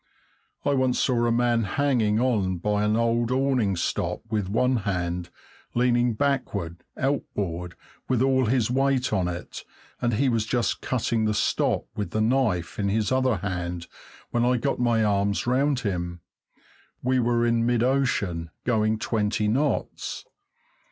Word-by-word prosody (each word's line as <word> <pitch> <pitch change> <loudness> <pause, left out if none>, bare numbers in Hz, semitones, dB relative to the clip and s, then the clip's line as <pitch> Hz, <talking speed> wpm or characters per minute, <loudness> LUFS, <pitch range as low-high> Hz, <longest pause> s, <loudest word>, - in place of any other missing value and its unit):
I 145 - +3
once 130 -2 +1
saw 120 -2 +2
a - - +2
man 120 0 +2
hanging 115 -1 +1
on 105 -8 +1
by 105 +3 0
an 105 +1 +2
old 115 0 +1
awning 130 -7 +1
stop 85 - -2
with 105 -4 -1
one 125 +5 +2
hand, 90 -4 -2 0.5
leaning 120 -1 +2
backward, 105 -11 -2
outboard, 90 - -2 0.3
with 130 -1 +2
all 130 -2 +3
his 120 -1 +1
weight 135 -2 +1
on 95 -4 +1
it, 90 0 -6 0.4
and 120 -1 +1
he 135 +5 +2
was 115 -3 +1
just 120 0 0
cutting 115 -3 0
the 105 0 +1
stop - - +1
with 105 - -3
the 110 - -2
knife 110 -8 +1
in 100 -1 +1
his 105 0 0
other 130 -2 +2
hand 90 -2 -3 0.5
when 120 - +1
I 125 +1 +3
got 140 +4 -1
my 120 -2 +2
arms 100 -1 +1
round 130 +2 +1
him. 85 -5 -3 0.8
We 130 +1 +2
were 120 0 +2
in 115 -1 +2
mid 120 -1 +2
ocean, 110 -11 0
going 110 -2 +1
twenty 105 -1 0
knots. 135 +7 -1
115 Hz, 150 wpm, -25 LUFS, 100-125 Hz, 0.8 s, I